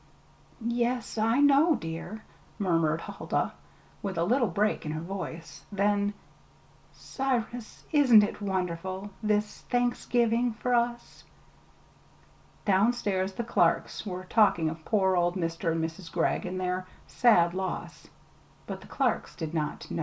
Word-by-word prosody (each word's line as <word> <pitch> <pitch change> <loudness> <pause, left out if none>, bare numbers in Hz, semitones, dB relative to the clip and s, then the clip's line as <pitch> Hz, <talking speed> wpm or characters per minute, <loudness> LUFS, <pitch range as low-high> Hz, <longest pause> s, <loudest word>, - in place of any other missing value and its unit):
"Yes, 235 0 -1
I 225 +4 +3
know, 290 +3 +5
dear," 175 +3 -6 0.3
murmured 165 -5 +1
Huldah, - - -2 0.5
with 195 -4 -4
a 165 - +2
little 240 +6 +2
break 205 +4 0
in 155 -1 -3
her 155 - -3
voice. 170 -2 -7
Then: 205 0 +1 0.8
"Cyrus, 245 -3 -3
ain't 255 -8 +7
it 205 - -3
wonderful 190 0 -3
this 210 -1 0
Thanksgiving, 240 -1 +1
for 250 +3 -2
us?" 240 0 -1 1.4
Downstairs 195 -2 +2
the 235 - -3
Clarks 235 - +1
were 185 -3 -5
talking 185 -5 +3
of 160 0 -9
poor 190 -3 +2
old 175 0 +2
Mr. 165 -1 -1
and 160 0 0
Mrs. 165 +1 -8
Gregg 175 +1 0
and 185 +1 -3
their 185 0 -2 0.2
"sad 175 -8 +4
loss;" 190 0 -5 0.6
but - - -6
the - - -13
Clarks - - -1
did 160 -2 -5
not 155 -2 -3
know. - - -2
200 Hz, 130 wpm, -28 LUFS, 175-235 Hz, 1.4 s, ain't